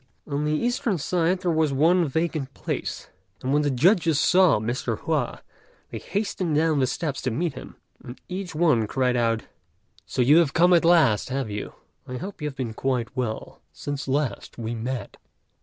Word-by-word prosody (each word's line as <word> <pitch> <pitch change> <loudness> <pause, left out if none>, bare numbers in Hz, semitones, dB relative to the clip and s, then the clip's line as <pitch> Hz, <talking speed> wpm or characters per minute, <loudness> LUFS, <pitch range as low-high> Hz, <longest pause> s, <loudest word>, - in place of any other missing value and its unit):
On 145 0 -2
the 150 - 0
eastern 240 - 0
side 175 +3 0
there 180 -2 +1
was 160 -2 +2
one 165 +5 +3
vacant 150 -2 -2
place; - - -4 0.3
and 130 +2 0
when 145 - +3
the 145 - +1
judges 160 - +3
saw 180 -6 +5
Mr. 115 +1 -2
Hua, 150 -7 -2 0.5
they - - -5
hastened 195 -5 -2
down 155 -1 +2
the 130 - +2
steps 145 0 -3
to 130 - -1
meet 155 +6 -1
him, - - -10 0.3
and 120 - -9
each 185 -2 -5
one 150 -10 +3
cried 125 +1 +1
out, 115 -2 +1 0.6
"So 125 - 0
you 145 +6 +6
have 165 -5 +3
come 175 +2 +5
at 170 - +5
last, 155 -13 +4
have 130 -4 -2
you? 105 0 -5 0.3
I 125 - -5
hope 190 +3 -7
you 150 - -1
have 140 - -6
been 120 -4 -3
quite 130 +1 -2
well 120 -4 -4
since 145 -1 -5
last 135 -5 -2
we 115 -1 -4
met." 120 +2 -5
145 Hz, 185 wpm, -25 LUFS, 125-170 Hz, 0.6 s, you